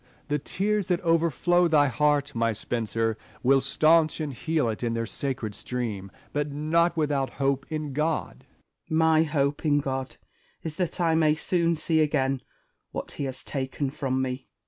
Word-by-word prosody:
The 150 Hz, 0 st, +1 dB
tears 205 Hz, +6 st, -1 dB
that 180 Hz, -2 st, +1 dB
overflow 170 Hz, +1 st, +3 dB
thy 150 Hz, -3 st, +4 dB
heart, 145 Hz, +2 st, +1 dB
my 115 Hz, -1 st, +1 dB
Spenser, 115 Hz, 0 st, -1 dB, 0.2 s
will 135 Hz, +2 st, +5 dB
staunch 155 Hz, +2 st, +3 dB
and 150 Hz, -3 st, -3 dB
heal 155 Hz, 0 st, 0 dB
it 110 Hz, -2 st, -3 dB
in 115 Hz, -1 st, -1 dB
their 115 Hz, 0 st, -1 dB
sacred 125 Hz, -5 st, -2 dB
stream; 110 Hz, -5 st, -4 dB, 0.2 s
but 145 Hz, 0 st, -1 dB
not 165 Hz, +4 st, +1 dB
without 145 Hz, -3 st, 0 dB
hope 135 Hz, -1 st, 0 dB
in 155 Hz, -3 st, -3 dB
God. 155 Hz, +3 st, -1 dB, 0.4 s
Spenser. 160 Hz, -, -2 dB
My 160 Hz, 0 st, +5 dB
hope 145 Hz, -2 st, 0 dB
in 150 Hz, -2 st, +3 dB
God 130 Hz, -3 st, -3 dB, 0.5 s
is 160 Hz, -1 st, -5 dB
that 180 Hz, -2 st, -2 dB
I 165 Hz, -2 st, +3 dB
may 155 Hz, -1 st, +4 dB
soon 170 Hz, +1 st, +1 dB
see 160 Hz, +1 st, 0 dB
again 135 Hz, -4 st, +1 dB, 0.5 s
what -, -, -5 dB
he 140 Hz, -, -4 dB
has 130 Hz, -1 st, -6 dB
taken 135 Hz, 0 st, -3 dB
from 130 Hz, -2 st, -1 dB
me. 130 Hz, 0 st, -4 dB
145 Hz, 170 wpm, -26 LUFS, 130-160 Hz, 0.5 s, will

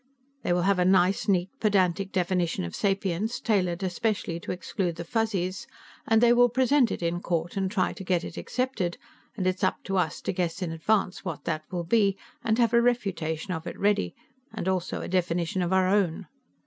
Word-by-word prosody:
"They -, -, -1 dB
will 175 Hz, 0 st, +2 dB
have 195 Hz, 0 st, +2 dB
a -, -, +4 dB
nice, 185 Hz, +1 st, +3 dB
neat, 185 Hz, -2 st, +2 dB
pedantic 195 Hz, -2 st, +2 dB
definition 180 Hz, -, 0 dB
of 85 Hz, -, -5 dB
sapience, 195 Hz, +2 st, -1 dB
tailored 185 Hz, -5 st, 0 dB
especially 185 Hz, -2 st, -1 dB
to -, -, -5 dB
exclude 180 Hz, -1 st, -2 dB
the 170 Hz, -, -5 dB
Fuzzies, 190 Hz, -2 st, -1 dB, 0.4 s
and 225 Hz, 0 st, +4 dB
they 240 Hz, 0 st, +7 dB
will 245 Hz, 0 st, +5 dB
present 260 Hz, +1 st, +3 dB
it -, -, -4 dB
in 170 Hz, +1 st, -1 dB
court 170 Hz, 0 st, -2 dB
and 190 Hz, -1 st, 0 dB
try 185 Hz, -2 st, 0 dB
to -, -, -8 dB
get 180 Hz, -2 st, +1 dB
it -, -, -7 dB
accepted, 235 Hz, -9 st, -2 dB, 0.4 s
and 190 Hz, -, -1 dB
it's 185 Hz, +2 st, 0 dB
up 185 Hz, -, 0 dB
to 195 Hz, 0 st, -1 dB
us 160 Hz, -5 st, 0 dB
to -, -, -2 dB
guess 180 Hz, 0 st, -2 dB
in 170 Hz, -, -3 dB
advance 185 Hz, +4 st, 0 dB
what 175 Hz, -6 st, -5 dB
that 155 Hz, -1 st, -2 dB
will 175 Hz, -2 st, -2 dB
be, 200 Hz, +1 st, +2 dB, 0.3 s
and 220 Hz, 0 st, +1 dB
have 235 Hz, -1 st, +3 dB
a 235 Hz, -, +6 dB
refutation 185 Hz, -8 st, -1 dB
of 160 Hz, 0 st, -5 dB
it -, -, -6 dB
ready, 200 Hz, -, +1 dB, 0.4 s
and 200 Hz, -5 st, -5 dB
also 185 Hz, -2 st, -1 dB
a -, -, -5 dB
definition 175 Hz, 0 st, 0 dB
of 175 Hz, 0 st, -1 dB
our 190 Hz, -1 st, +3 dB
own." 190 Hz, -2 st, +1 dB
185 Hz, 200 wpm, -27 LUFS, 175-205 Hz, 0.4 s, they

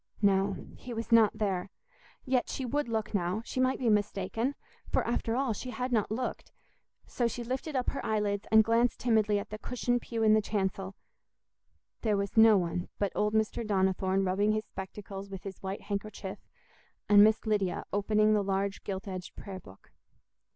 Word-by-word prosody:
No, 195 Hz, 0 st, +3 dB, 0.2 s
he 245 Hz, -2 st, -7 dB
was 230 Hz, +1 st, -5 dB
not 220 Hz, -2 st, +5 dB
there; 195 Hz, -3 st, -1 dB, 0.6 s
yet 255 Hz, -2 st, +1 dB
she 265 Hz, -, -3 dB
would 285 Hz, 0 st, -1 dB
look 220 Hz, -1 st, -2 dB
now—she 200 Hz, +6 st, -2 dB
might 255 Hz, 0 st, +2 dB
be 250 Hz, -, -1 dB
mistaken—for, 210 Hz, +4 st, -1 dB
after 230 Hz, -1 st, -1 dB
all, 260 Hz, -3 st, +1 dB
she 250 Hz, +5 st, -6 dB
had 250 Hz, 0 st, -3 dB
not 220 Hz, -4 st, +1 dB
looked. 240 Hz, +4 st, -4 dB, 0.5 s
So 240 Hz, -, 0 dB
she 235 Hz, +1 st, -4 dB
lifted 260 Hz, +5 st, -4 dB
up 255 Hz, -1 st, 0 dB
her -, -, -5 dB
eyelids 210 Hz, -2 st, -1 dB
and 220 Hz, 0 st, +7 dB
glanced 230 Hz, +2 st, +2 dB
timidly 215 Hz, -3 st, +2 dB
at 200 Hz, -, -5 dB
the 215 Hz, -, -5 dB
cushioned 245 Hz, +1 st, -1 dB
pew 225 Hz, -1 st, -3 dB
in 215 Hz, -1 st, +6 dB
the 215 Hz, -, +4 dB
chancel—there 200 Hz, +1 st, -5 dB
was 200 Hz, 0 st, -3 dB
no 220 Hz, -2 st, +7 dB
one 175 Hz, 0 st, -2 dB
but 200 Hz, -2 st, 0 dB
old 210 Hz, +1 st, 0 dB
Mr. 220 Hz, +2 st, +1 dB
Donnithorne 190 Hz, -2 st, +1 dB
rubbing 200 Hz, +3 st, +2 dB
his 215 Hz, 0 st, -1 dB
spectacles 195 Hz, 0 st, -8 dB
with 195 Hz, -1 st, -8 dB
his 195 Hz, -2 st, -8 dB
white 195 Hz, +1 st, -4 dB
handkerchief, 200 Hz, -1 st, -5 dB, 0.7 s
and 205 Hz, 0 st, +8 dB
Miss 220 Hz, +2 st, +3 dB
Lydia 205 Hz, -4 st, 0 dB
opening 215 Hz, +1 st, +3 dB
the 210 Hz, -1 st, +2 dB
large 195 Hz, 0 st, -1 dB
gilt 195 Hz, 0 st, -5 dB
edged 185 Hz, -2 st, -6 dB
prayer 195 Hz, -2 st, -7 dB
book. 95 Hz, -, -17 dB
210 Hz, 170 wpm, -30 LUFS, 195-230 Hz, 0.7 s, and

